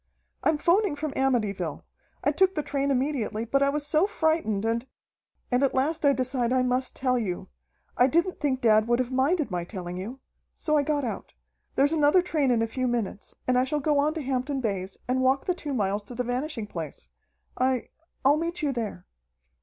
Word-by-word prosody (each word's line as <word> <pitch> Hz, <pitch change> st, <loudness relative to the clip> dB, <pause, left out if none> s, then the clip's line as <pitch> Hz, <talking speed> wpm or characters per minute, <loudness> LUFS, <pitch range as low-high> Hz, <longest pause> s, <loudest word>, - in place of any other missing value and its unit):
"I'm 315 Hz, -, +3 dB
'phoning 350 Hz, +2 st, +2 dB
from 295 Hz, 0 st, -3 dB
Amityville. 210 Hz, -, 0 dB, 0.4 s
I -, -, +3 dB
took 380 Hz, 0 st, +3 dB
the 300 Hz, -, 0 dB
train 280 Hz, -1 st, -1 dB
immediately, 255 Hz, -5 st, 0 dB
but 275 Hz, +4 st, +1 dB
I 280 Hz, -, +4 dB
was 290 Hz, +1 st, -1 dB
so 310 Hz, +5 st, +3 dB
frightened, 315 Hz, -, 0 dB
and 230 Hz, +3 st, -1 dB, 0.6 s
and 245 Hz, +1 st, +3 dB
at 275 Hz, -, +2 dB
last 295 Hz, +5 st, 0 dB
I 285 Hz, -, +7 dB
decide 255 Hz, -2 st, 0 dB
I 255 Hz, 0 st, +3 dB
must 255 Hz, +1 st, 0 dB
tell 255 Hz, -2 st, +1 dB
you. 185 Hz, -6 st, -4 dB, 0.5 s
I 250 Hz, -, +5 dB
didn't 340 Hz, +6 st, +1 dB
think 265 Hz, -4 st, 0 dB
dad 215 Hz, -1 st, +4 dB
would 240 Hz, 0 st, +3 dB
have 255 Hz, 0 st, -1 dB
minded 275 Hz, -, +1 dB
my 175 Hz, -1 st, -1 dB
telling 180 Hz, -1 st, -6 dB
you. 225 Hz, +8 st, -6 dB, 0.4 s
So 305 Hz, -2 st, 0 dB
I 295 Hz, -, +5 dB
got 290 Hz, 0 st, 0 dB
out. 230 Hz, -, -5 dB, 0.4 s
There's 285 Hz, +3 st, +3 dB
another 310 Hz, +3 st, +4 dB
train 305 Hz, -6 st, +1 dB
in 235 Hz, -2 st, +3 dB
a -, -, 0 dB
few 255 Hz, +3 st, -2 dB
minutes, 230 Hz, -4 st, -3 dB
and 250 Hz, 0 st, +3 dB
I -, -, +3 dB
shall 295 Hz, +3 st, -1 dB
go 295 Hz, 0 st, +2 dB
on 300 Hz, +3 st, +1 dB
to 315 Hz, -, -3 dB
Hampton 265 Hz, +1 st, -1 dB
Bays 195 Hz, -5 st, -3 dB
and 255 Hz, +1 st, +1 dB
walk 260 Hz, +1 st, +2 dB
the 365 Hz, -, +1 dB
two 315 Hz, -4 st, -6 dB
miles 205 Hz, -4 st, 0 dB
to 245 Hz, -, -9 dB
the 250 Hz, -, -1 dB
Vanishing 250 Hz, 0 st, -3 dB
Place. 160 Hz, -, -7 dB, 0.5 s
I 255 Hz, -1 st, +1 dB, 0.4 s
I'll 285 Hz, +3 st, +6 dB
meet 335 Hz, +1 st, -3 dB
you 290 Hz, -, +2 dB
there." 220 Hz, -7 st, -4 dB
260 Hz, 205 wpm, -27 LUFS, 230-295 Hz, 0.6 s, I